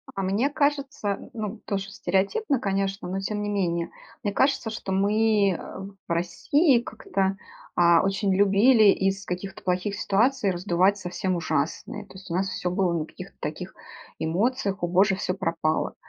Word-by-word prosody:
А 195 - -2
мне 205 +9 +1
кажется, 280 -8 -1
ну, 215 -1 -5
тоже 195 -1 -3
стереотипно, 215 - 0
конечно, 195 -2 -1
но 190 +2 -2
тем 210 +2 -3
не 205 - -2
менее, 170 -4 -1 0.3
мне 205 - -1
кажется, 265 -1 +2
что 215 -3 -5
мы, 205 +1 +3
э, 175 - -2 0.5
в - - -6
России 250 - +2
как-то, 195 -4 -2 0.4
а, 170 -1 +5
очень 195 0 +1
любили 205 +4 +5
из 195 0 0
каких-то 180 +2 -5
плохих 185 +3 -1
ситуаций 210 +2 +2
раздувать 185 +2 +2
совсем 180 0 -2
ужасные. 165 - -2
То - - -17
есть 190 0 -11
у - - -3
нас 190 +1 0
всё 180 -1 -2
было 180 0 +1
на 160 -2 -1
каких-то - - -11
таких - - -5 0.5
эмоциях: 200 +3 0
"О 175 - +2
Боже, 190 +3 +3
всё 185 -1 -2
пропало". 165 -4 -1
195 Hz, 160 wpm, -25 LUFS, 185-210 Hz, 0.5 s, а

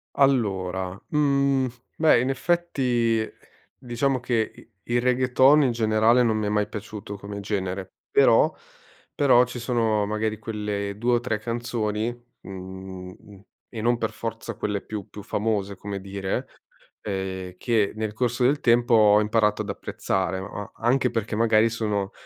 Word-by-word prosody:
Allora, 95 -8 +1
mhmm, 140 -3 +2 0.3
beh, 155 -6 +5
in 125 +2 0
effetti, 130 -7 +1 0.5
diciamo 130 +2 -1
che 120 -2 0
i - - -17 0.2
il 120 - +3
reggaeton 130 +3 +4
in 130 - +2
generale 110 +1 +3
non 115 -2 +2
mi 105 -1 -1
è - - 0
mai 105 0 +1
piaciuto 105 -1 -7
come 100 +1 -7
genere, 95 -2 -3 0.2
però - - +5 0.6
però 130 -3 +5
ci 125 0 -7
sono 115 -4 +1
magari 110 +1 -1
quelle 105 -2 -4
2 120 +3 +1
o 120 - +4
3 120 -3 -1
canzoni, 115 -1 -2 0.3
mhmm, 95 -1 -8 0.6
e 115 - -7
non 120 +1 +2
per 115 -2 -2
forza 115 0 -5
quelle 105 -2 -2
più 105 -3 -7
più 105 - -10
famose, 100 -2 -1
come 100 -1 -5
dire, 95 0 -3 0.5
ehm, 95 -2 -4
che 110 -2 +1
nel 110 -1 -3
corso 120 +2 0
del 145 +3 +3
tempo 120 0 +3
ho 105 -2 +6
imparato 105 0 +2
ad - - -8
apprezzare, 95 -1 -2
ma 95 - -6
a 105 - -9
anche 125 +2 +2
perché 115 -2 -2
magari 115 0 +4
sono 105 -3 -2
110 Hz, 150 wpm, -25 LUFS, 100-120 Hz, 0.6 s, ho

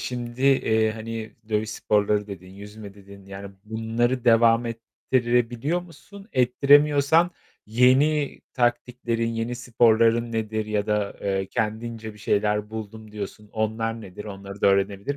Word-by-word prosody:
şimdi, 120 0 -5
eee, 110 -5 +3
hani 110 -1 -7
"dövüş 110 0 -1
sporları" 105 -1 +1
dedin, 90 -2 -9
"yüzme" 100 +1 -11
dedin. 100 -1 -15
Yani 100 0 -9
bunları 115 +3 -1
devam 115 0 +4
ettirebiliyor 120 +5 -1
musun? 195 +4 -14
Ettiremiyorsan 145 +5 +4 0.4
yeni 135 +6 +3
taktiklerin, 120 -1 -1
yeni 115 +1 -3
sporların 115 -1 +2
nedir? 110 -1 -2
Ya 105 -1 -1
da, 105 -1 -1
eee, 95 -1 -1
kendince 110 +1 -3
"Bir 105 - -16
şeyler 105 +1 0
buldum." 110 0 -8
diyorsun. 105 0 -7
Onlar 115 +1 -2
nedir? 105 0 -10
Onları 100 -1 -9
da - - +3
öğrenebilir 100 +6 +1
110 Hz, 125 wpm, -24 LUFS, 105-120 Hz, 0.4 s, devam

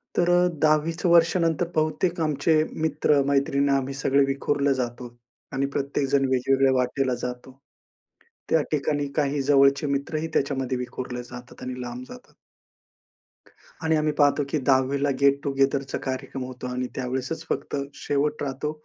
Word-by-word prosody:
तर 175 0 +2
अ, 175 0 +4
10वी 155 +1 +3
चं 170 +2 -1
वर्षानंतर 170 0 +3
बहुतेक 160 +3 0
आमचे 155 +1 +1 0.3
मित्र 150 -1 +2
मैत्रिण 140 0 +2
आम्ही 135 0 0
सगळे 140 0 +2
विखुरले 140 0 +1
जातो 120 -1 -4 0.4
आणि 135 +1 0
प्रत्येकजण 140 0 +1
वेगवेगळ्या 135 +1 +3
वाटेला 125 0 0
जातो, 125 +2 -7 0.9
त्या 160 - +4
ठिकाणी 145 -1 0
काही 145 -2 +1
जवळचे 140 +1 +4
मित्रही 145 +3 -2
त्याच्यामध्ये 135 -2 0
विखुरले 125 0 -5
जातात 125 0 -12
आणि 125 0 -5
लांब 125 +1 -6
जातात. 250 - -13 1.5
आणि 160 0 +2
आम्ही 150 0 +1
पाहतो 145 -1 +3
की 155 - 0
10वी 135 +1 +2
ला 145 - +2
गेट 140 0 +4
टुगेदरचा 135 0 0
कार्यक्रम 130 0 -4
होतो 125 0 -7
आणि 125 0 -3
त्यावेळेसच 130 +5 -3
फक्त - - -3 0.2
शेवट 145 +1 -1
राहतो, 140 +2 -3
140 Hz, 140 wpm, -25 LUFS, 130-150 Hz, 1.5 s, अ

